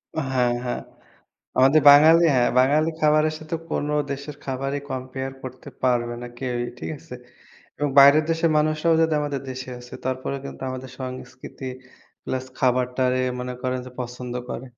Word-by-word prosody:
অ - - 0
হ্যাঁ, 125 -1 +2
হ্যাঁ। 120 - -2 0.8
আমাদের 135 +4 +5
বাঙালি 160 +4 +7
অ্যা 125 -1 +4 0.2
বাঙালি 150 +5 +3
খাবারের 155 0 +3
সাথে 155 +1 -4 0.2
কোন 145 - -1 0.2
দেশের 140 +1 -6
খাবারই 135 +1 -2
compare 130 +1 -5
করতে 130 0 -9
পারবে 120 -1 +1
না, 120 - -5
কেউই। 120 -2 -2
ঠিক - - -4
আছে? 160 -6 -10 0.6
এবং 145 0 0
বাইরের 140 +3 +8
দেশের 165 0 +1
মানুষরাও 155 +2 +2
যদি 160 -1 +2
আমাদের 145 -2 -3
দেশে 130 0 -7
আসে, 125 0 -13
তারপরেও 130 +1 -2
কিন্তু 140 - -9
আমাদের 130 0 -7
সংস্কৃতি 130 +1 -8 0.6
plus 130 0 -3
খাবারটারে 125 0 +1 0.2
মনে 125 0 -4
করেন 130 -1 -1
যে - - -10
পছন্দ 125 0 -6 0.2
করে। 130 +2 -5
130 Hz, 155 wpm, -23 LUFS, 125-150 Hz, 0.8 s, বাইরের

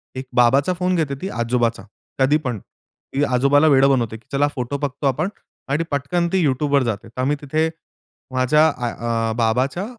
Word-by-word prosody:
एक 130 - -5
बाबाचा 135 +7 +4
फोन 180 +1 0
घेते 150 -5 -1
ती 190 - -3
आजोबाचा 120 - -1 0.4
कधी 135 +3 +4
पण 125 -7 -4
ती 140 +8 -7
आजोबाला 140 +3 +3
वेडं 135 -1 +5
बनवते, 115 -4 0
की 110 - -24
चला 140 +1 +2
फोटो 125 +2 -3
बघतो 140 0 -2
आपण 135 +8 0 0.4
आणि 145 +4 +1
पटकन 145 +5 0
ती 185 -3 +3
YouTubeवर 140 0 +2
जाते. 110 -2 -3
तर 120 +3 -6
आम्ही 145 +3 +1
तिथे 155 +3 0 0.6
माझ्या 150 +5 +4
अ, 125 -5 -4 0.2
आ 115 -1 0
बाबाच्या, 125 - 0
135 Hz, 175 wpm, -21 LUFS, 125-150 Hz, 0.6 s, वेडं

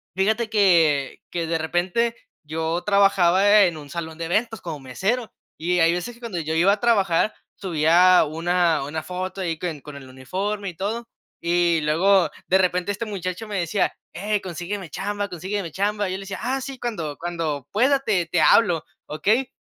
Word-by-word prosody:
fíjate 220 +4 +1
que 165 -10 +3
que 170 -2 -2
de 165 0 0
repente 180 +9 0 0.3
yo 160 +3 -2
trabajaba 200 0 +5
en 170 -4 +1
un 145 -2 -11
salón 160 -1 -6
de 170 - -4
eventos 225 +6 -1
como 160 -4 -6
mesero, 200 - -2 0.3
y 180 +2 0
hay 165 +1 +4
veces 180 +7 -4
que - - -19
cuando 225 -8 -4
yo 160 +1 -3
iba 185 +5 +4
a 210 - -3
trabajar 205 -5 +2 0.2
subía 180 +1 +4
una 165 -1 +1
una 155 +2 -4
foto 185 +1 -5
ahí 165 -3 -2
que 180 - -3
n 150 -4 -8
con 150 -1 -10
el 135 -2 -11
uniforme 195 +11 -4
y 175 - -10
todo, 225 +6 -3 0.3
y 170 -1 +2
luego, 180 +5 +3 0.2
de 190 - +4
repente 180 +1 +1
este 215 +3 -4
muchacho 195 +1 -5
me 200 -3 -2
decía: 180 +3 0 0.2
"Ey, 205 +3 -1
consígueme 185 +1 -5
chamba, 205 +2 -3
consígueme 185 0 -4
chamba". 205 +2 -1
Yo 185 - -3
le 195 - -8
decía: 195 -1 -6
"Ah, 265 +2 -1
sí, 265 -1 -7
cuando 165 -12 -4
cuando 165 -5 -3
pueda 265 +6 +3
te 195 -9 +1
te 165 - 0
hablo, 175 -8 +4 0.2
¿okey?". 220 +12 +1
180 Hz, 185 wpm, -23 LUFS, 165-205 Hz, 0.3 s, trabajaba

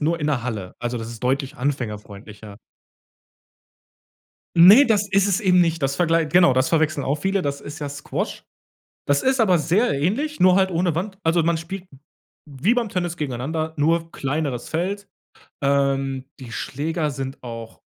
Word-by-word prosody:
nur 165 +3 0
in - - -2
'ner 135 -5 0
Halle, 105 -7 -5
also 120 0 -3
das 115 - -6
ist 115 -1 -10
deutlich 135 +1 -1
anfängerfreundlicher. 105 -5 -5 2.0
Ne, 195 +11 +9
das 210 -4 +1
ist 195 +1 +3
es 195 -2 +1
eben 180 -3 +4
nicht, 165 -2 0
das 135 0 0
verglei 165 -1 +2
genau, 170 -3 +4
das 130 +1 +1
verwechseln 155 -3 +1
auch 140 +3 0
viele. 195 +5 -1
Das 140 -3 -3
ist 145 +2 -8
ja 145 - -4
Squash. 145 +1 -5 0.6
Das 145 0 +2
ist 265 0 +2
aber 190 -6 +4
sehr 175 - +1
ähnlich, 275 - -1
nur 185 0 +6
halt 190 0 +3
ohne 175 -1 0
Wand, 190 +3 -4
also, 165 +1 +3
man 170 0 +1
spielt 180 +3 -7 0.6
wie 145 - +1
beim 240 -3 -1
Tennis 175 -2 -3
gegeneinander, 155 +4 -3
nur 165 +3 +1
kleineres 140 -2 -3
Feld, 195 +5 -3 0.5
ähm, 135 -1 0
die 125 -3 -10
Schläger 155 +5 -2
sind 135 0 -6
auch 115 -2 -9
155 Hz, 165 wpm, -22 LUFS, 135-180 Hz, 2.0 s, Ne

